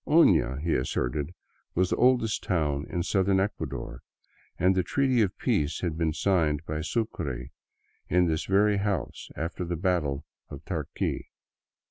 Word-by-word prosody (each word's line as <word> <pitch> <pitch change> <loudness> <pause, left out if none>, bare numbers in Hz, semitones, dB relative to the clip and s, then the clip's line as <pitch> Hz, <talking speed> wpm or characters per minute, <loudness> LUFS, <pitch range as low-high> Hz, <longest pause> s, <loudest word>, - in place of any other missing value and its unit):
Oiia, 85 - +4
he 85 - +1
asserted, 70 +6 -1 0.4
was 90 +1 +2
the - - +3
oldest 125 -4 +3
town 75 -6 0
in 85 - -1
Southern 95 0 +2
Ecuador, 95 -10 -3 0.6
and 90 +3 +4
the 95 - +2
treaty 130 +4 +2
of 100 -4 0
peace 75 +2 0
had 85 -4 -1
been 80 -1 +1
signed 80 -4 +1
by 75 0 -3
Sucre 75 - -3 0.6
in 90 +1 +4
this 80 0 0
very 100 +1 +3
house 100 -7 -2
after 85 +3 -3
the 85 0 -2
battle 80 -6 0 0.2
of - - -9
Tarqui. - - -3
85 Hz, 145 wpm, -28 LUFS, 75-100 Hz, 0.6 s, Oiia